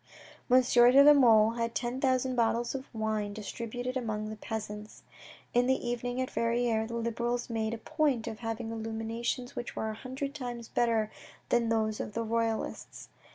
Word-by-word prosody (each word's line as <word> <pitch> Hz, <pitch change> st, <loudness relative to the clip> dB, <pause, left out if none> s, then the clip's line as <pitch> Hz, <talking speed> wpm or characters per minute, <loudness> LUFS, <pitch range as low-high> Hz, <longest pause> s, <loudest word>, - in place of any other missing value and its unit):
Monsieur 245 Hz, -1 st, +6 dB
de 275 Hz, +2 st, +8 dB
la 295 Hz, +1 st, +9 dB
Mole 225 Hz, -6 st, +6 dB
had 230 Hz, 0 st, -2 dB
ten 245 Hz, +2 st, -2 dB
thousand 260 Hz, -1 st, +1 dB
bottles 235 Hz, 0 st, +1 dB
of 270 Hz, 0 st, -6 dB
wine 215 Hz, -2 st, -2 dB
distributed 235 Hz, +4 st, -5 dB
among 215 Hz, -4 st, -2 dB
the -, -, -5 dB
peasants. 210 Hz, -1 st, -6 dB, 0.5 s
In 245 Hz, 0 st, +3 dB
the 265 Hz, -, +4 dB
evening 245 Hz, +1 st, -2 dB
at 255 Hz, -, -2 dB
Verrieres, 230 Hz, -1 st, +1 dB
the 235 Hz, -, -5 dB
Liberals 235 Hz, +1 st, -2 dB
made 220 Hz, 0 st, -1 dB
a -, -, -7 dB
point 285 Hz, -2 st, 0 dB
of 225 Hz, -2 st, -6 dB
having 225 Hz, 0 st, -4 dB
illuminations 225 Hz, +2 st, -3 dB
which 240 Hz, -, -5 dB
were 220 Hz, -, -2 dB
a -, -, -7 dB
hundred 265 Hz, +4 st, -5 dB
times 245 Hz, -5 st, -6 dB
better 225 Hz, -3 st, +1 dB, 0.4 s
than 235 Hz, -1 st, +2 dB
those 220 Hz, -1 st, 0 dB
of -, -, -4 dB
the 230 Hz, -, -1 dB
Royalists. 225 Hz, 0 st, -2 dB
235 Hz, 170 wpm, -30 LUFS, 220-245 Hz, 0.5 s, la